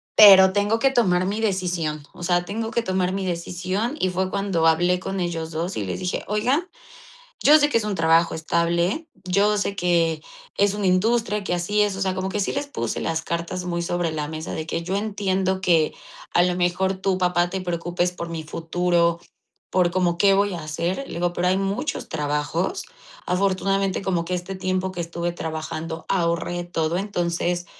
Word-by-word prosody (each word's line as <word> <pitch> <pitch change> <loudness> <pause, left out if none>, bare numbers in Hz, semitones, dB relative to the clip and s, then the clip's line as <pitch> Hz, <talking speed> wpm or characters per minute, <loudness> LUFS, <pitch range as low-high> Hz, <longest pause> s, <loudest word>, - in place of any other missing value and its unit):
pero 190 -2 +9
tengo 205 +2 +2
que 270 +3 +3
tomar 185 -8 +2
mi 205 +4 -2
decisión, 175 -7 -1
o - - -13
sea, 175 0 +1
tengo 225 +3 -3
que 235 - -1
tomar 185 -1 0
mi 195 0 -2
decisión". 185 - -2
Y 185 - +1
fue 185 +1 -1
cuando 190 -5 +1
hablé 175 +3 +3
con 195 +1 -4
ellos 165 -2 -3
2, 170 +4 -3
y 105 - -2
les 90 - -4
dije: 180 0 -2
"Oigan, 255 - 0 0.7
yo 300 +2 +8
sé 290 0 +3
que 230 - +2
es 215 - -4
un 205 -2 -2
trabajo 165 +1 +3
estable, 170 - 0 0.2
yo 200 +3 +2
sé 200 0 -1
que 170 -4 +1 0.3
es 200 0 +3
una 205 -2 -1
industria 210 +2 +2
que 195 - -3
así 205 +4 +1
es", 205 -2 0
o - - -6
sea, 190 -1 0
como 185 0 -2
que 210 - -2
sí 200 - 0
les 280 +1 -3
puse - - -3
las 160 0 -1
cartas 170 +2 -3
muy 170 -1 -2
sobre 170 -1 -1
la 150 -1 -3
mesa 160 0 -5
de 160 - -4
que: 165 - -2
"Yo 185 +2 -2
entiendo 190 -2 -1
que 165 -4 +2 0.4
a 175 - +4
lo 180 0 +1
mejor 180 +2 +1
tú 190 0 -1
papá, 180 -1 +1
te 190 +1 -3
preocupes 175 0 -1
por 170 -1 -6
mi 160 -1 -5
futuro, 170 +1 +1 0.5
por 180 -2 +2
como 175 -1 +1
qué 195 +2 +5
voy 200 -1 +1
a 165 - -5
hacer". 170 - -2
Le - - -7
digo: 175 +1 0
"Pero 180 +1 0
hay 185 - +3
muchos 195 +9 -2
trabajos. 150 - -2 0.4
Afortunadamente, 195 +1 +1
como 180 -3 0
que 180 +2 -3
este 180 +2 -4
tiempo 185 0 -2
que 175 - -5
estuve 170 +1 -3
trabajando 160 0 -5
ahorré 175 -1 0
todo, 165 -1 -1
entonces, 175 -2 -1
180 Hz, 195 wpm, -23 LUFS, 170-195 Hz, 0.7 s, pero